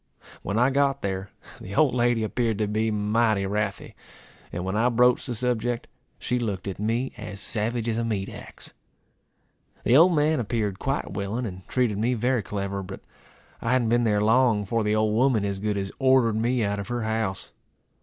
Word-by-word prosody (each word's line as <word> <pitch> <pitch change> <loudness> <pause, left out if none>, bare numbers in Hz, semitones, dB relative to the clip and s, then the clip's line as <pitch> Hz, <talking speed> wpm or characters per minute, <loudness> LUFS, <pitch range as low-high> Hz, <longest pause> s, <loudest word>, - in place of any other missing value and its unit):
When 100 - -2
I 125 +3 +4
got 140 0 +1
there, 95 0 -3 0.3
the 100 +2 -8
old 145 -1 +4
lady 120 -2 +2
appeared 115 0 -1
to 105 - +1
be 110 +2 0
mighty 105 -1 +1
wrathy; 105 0 -3 0.6
and 90 +1 -4
when 95 +2 -2
I 115 +3 +3
broached 125 +2 +3
the 120 - -3
subject, 120 0 -1 0.3
she 125 +2 -1
looked 100 -5 -3
at 95 - -5
me 115 +5 -1
as 105 -3 -7
savage 115 +2 -2
as 115 0 0
a - - 0
meat 105 -4 -2
axe. - - -10 1.1
The 120 - +4
old 170 +4 +6
man 150 0 +2
appeared 105 -4 -2
quite 135 +1 -2
willing, 105 +5 -3
and 95 -3 -8
treated 120 -6 0
me 120 +3 +1
very 120 +1 +1
clever. 100 -1 -4
But 95 0 -8 0.6
I 115 - 0
hadn't 120 -3 +2
been 120 +1 +3
there 105 -2 +2
long, 115 -1 +4
before 110 +3 -1
the 105 0 +1
old 110 0 +2
woman 115 -3 +2
as 100 -1 -2
good 105 0 -1
as 95 0 -3
ordered 130 -4 +4
me 120 +2 +1
out 100 0 -1
of 100 - -5
her 120 -1 -2
house. 110 -3 -2
110 Hz, 195 wpm, -25 LUFS, 100-120 Hz, 1.1 s, old